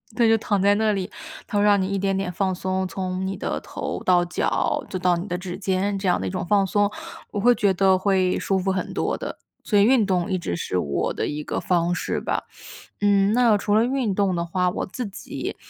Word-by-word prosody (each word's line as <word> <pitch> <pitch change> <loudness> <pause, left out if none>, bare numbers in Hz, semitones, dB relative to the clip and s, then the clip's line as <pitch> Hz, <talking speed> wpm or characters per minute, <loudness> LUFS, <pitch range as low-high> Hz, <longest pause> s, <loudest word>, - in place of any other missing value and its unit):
对， 235 -1 +4
就 225 - +5
躺 205 -3 0
在 200 +1 +4
那 215 0 +2
里， 190 -2 -3 0.4
它 205 - -2
会 205 - +3
让 205 -2 +4
你 185 - -1
一 200 - -1
点 195 0 0
点 190 -2 -2
放 190 +1 0
松， 185 +1 -2
从 185 0 -3
你 195 +1 -3
的 - - -3
头 - - -5
到 180 -1 +4
脚 175 - -1
就 185 - -3
到 180 -1 +3
你 180 +4 -5
的 180 - -2
指 180 0 -6
尖， 195 +1 -1
这 195 -1 -3
样 175 - +2
的 95 - -2
一 - - -1
种 - - -3
放 200 +1 +3
松， 205 +1 +1 0.4
我 205 - -3
会 245 +3 +5
觉 200 -2 +2
得 190 0 +4
会 185 -1 +1
舒 195 -1 0
服 190 +1 0
很 185 -1 -3
多 - - -1
的， - - -6 0.2
所 205 -2 +2
以 - - +6
运 235 -2 +4
动 180 -2 0
一 185 - 0
直 90 - -3
是 90 - -2
我 70 -5 -1
的 - - -2
一 150 0 -4
个 - - -3
方 175 -1 +1
式 - - -2
吧。 - - -2 0.6
嗯， 200 0 +3
那 230 -3 +4
除 205 0 -1
了 225 +2 +4
运 250 -6 0
动 195 -2 +1
的 170 0 -1
话， 180 +1 0
我 - - -3
自 245 +5 -5
己， 195 - -6
195 Hz, 265 characters per minute, -23 LUFS, 180-205 Hz, 0.6 s, 以